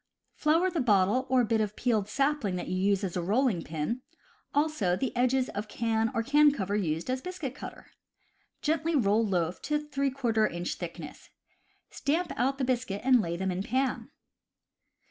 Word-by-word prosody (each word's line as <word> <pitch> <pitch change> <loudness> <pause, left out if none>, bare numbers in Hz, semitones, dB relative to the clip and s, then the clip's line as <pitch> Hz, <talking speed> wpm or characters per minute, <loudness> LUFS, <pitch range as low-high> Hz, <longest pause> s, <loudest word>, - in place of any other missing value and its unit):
Flour 330 +5 +2
the 340 - -1
bottle 210 +2 +3
or 255 -1 +4
bit 220 -1 +1
of 210 -1 -2
peeled 220 -5 0
sapling 275 -6 0
that 180 - -4
you 185 - -2
use 195 +1 +1
as 185 -3 -3
rolling 200 +2 +1
pin, 160 - -3 0.5
also 290 - +1
the 255 +7 -3
edges 255 +1 +2
of 205 +1 -4
can 225 0 0
or 230 - +1
can 295 +4 +5
cover 205 -7 -2
used 165 -5 -1
as 255 0 -1
biscuit 360 -7 -5
cutter. 290 - -10 0.7
Gently 320 +1 +1
roll 220 -3 +3
loaf 180 -4 -1
to 300 - 0
three 280 -2 -1
quarter 235 -5 +1
inch 175 +1 -3
thickness. 170 -3 -8 0.6
Stamp 330 +5 -1
out 270 +3 0
the 275 - -2
biscuit 245 -6 -1
and 255 -2 +5
lay 170 -2 -3
them 190 +1 -1
in 180 +1 -2
pan. 260 +5 -1
230 Hz, 170 wpm, -29 LUFS, 195-275 Hz, 0.7 s, can